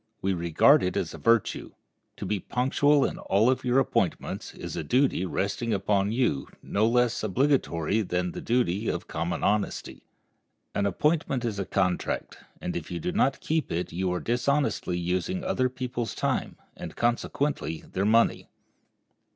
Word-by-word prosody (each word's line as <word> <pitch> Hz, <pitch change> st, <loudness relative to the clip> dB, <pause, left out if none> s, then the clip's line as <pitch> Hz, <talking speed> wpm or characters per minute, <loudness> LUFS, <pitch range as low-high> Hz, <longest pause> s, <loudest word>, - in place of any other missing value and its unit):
We 95 Hz, 0 st, 0 dB
regard 85 Hz, -, +4 dB
it 90 Hz, -, -1 dB
as -, -, -2 dB
a -, -, -8 dB
virtue. 115 Hz, -2 st, +1 dB, 0.4 s
To -, -, -5 dB
be 105 Hz, -, -1 dB
punctual 135 Hz, -, +2 dB
in -, -, -3 dB
all 105 Hz, +6 st, +3 dB
of 130 Hz, -, -2 dB
your 125 Hz, 0 st, +2 dB
appointments 135 Hz, -, 0 dB
is -, -, -6 dB
a -, -, -3 dB
duty 125 Hz, -, +2 dB
resting 105 Hz, +6 st, -1 dB
upon 100 Hz, +1 st, +1 dB
you 115 Hz, -, 0 dB, 0.2 s
no 105 Hz, +2 st, +1 dB
less 120 Hz, 0 st, +2 dB
obligatory 110 Hz, -, +1 dB
than 90 Hz, -2 st, -1 dB
the -, -, -7 dB
duty 115 Hz, -4 st, 0 dB
of -, -, -2 dB
common 85 Hz, +1 st, -3 dB
honesty. 105 Hz, +1 st, -1 dB, 0.7 s
An 100 Hz, 0 st, +1 dB
appointment 135 Hz, -, 0 dB
is 105 Hz, -4 st, -2 dB
a 100 Hz, -, -1 dB
contract, 90 Hz, -2 st, -1 dB, 0.2 s
and 90 Hz, -, -4 dB
if 85 Hz, -, -5 dB
you 85 Hz, -, -4 dB
do 90 Hz, -, -2 dB
not 135 Hz, -, +1 dB
keep 160 Hz, -3 st, -1 dB
it 85 Hz, +2 st, -2 dB
you 90 Hz, +1 st, -1 dB
are 90 Hz, -, -1 dB
dishonestly 125 Hz, -6 st, 0 dB
using 95 Hz, -, -1 dB
other 130 Hz, -7 st, +1 dB
people's 125 Hz, -2 st, -4 dB
time, -, -, -1 dB, 0.2 s
and, -, -, -8 dB
consequently, 120 Hz, -, -1 dB
their 95 Hz, -, 0 dB
money. 115 Hz, +2 st, +3 dB
110 Hz, 160 wpm, -27 LUFS, 90-130 Hz, 0.7 s, regard